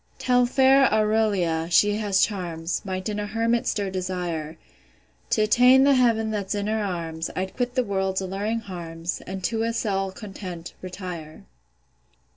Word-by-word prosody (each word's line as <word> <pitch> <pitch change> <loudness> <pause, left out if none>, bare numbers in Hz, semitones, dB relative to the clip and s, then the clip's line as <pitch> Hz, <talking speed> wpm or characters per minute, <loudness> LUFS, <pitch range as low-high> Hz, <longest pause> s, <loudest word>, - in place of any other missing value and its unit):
Tell 250 -1 +3
fair 265 +1 +5
AURELIA, 210 -7 +1
she 205 +4 +4
has 200 -3 +3
charms, 175 -5 -4
Might 185 0 -4
in 210 -1 -2
a 205 - -3
hermit 230 +3 0
stir 200 -2 -1
desire. 175 -4 -3 0.7
T' 215 - +2
attain 250 +5 +6
the 280 0 +5
heav'n 230 -4 +2
that's 205 -1 -2
in 205 0 -2
her 215 0 0
arms, 165 -4 -3
I'd 190 +1 -3
quit 245 0 -2
the 255 - +2
world's 190 -3 -1
alluring 200 +4 -2
harms, 170 -3 -5
And 190 0 -6
to 225 +4 0
a 230 0 0
cell 195 -4 -1
content, 185 -4 -8
retire. 180 -4 -7
200 Hz, 155 wpm, -24 LUFS, 180-225 Hz, 0.7 s, attain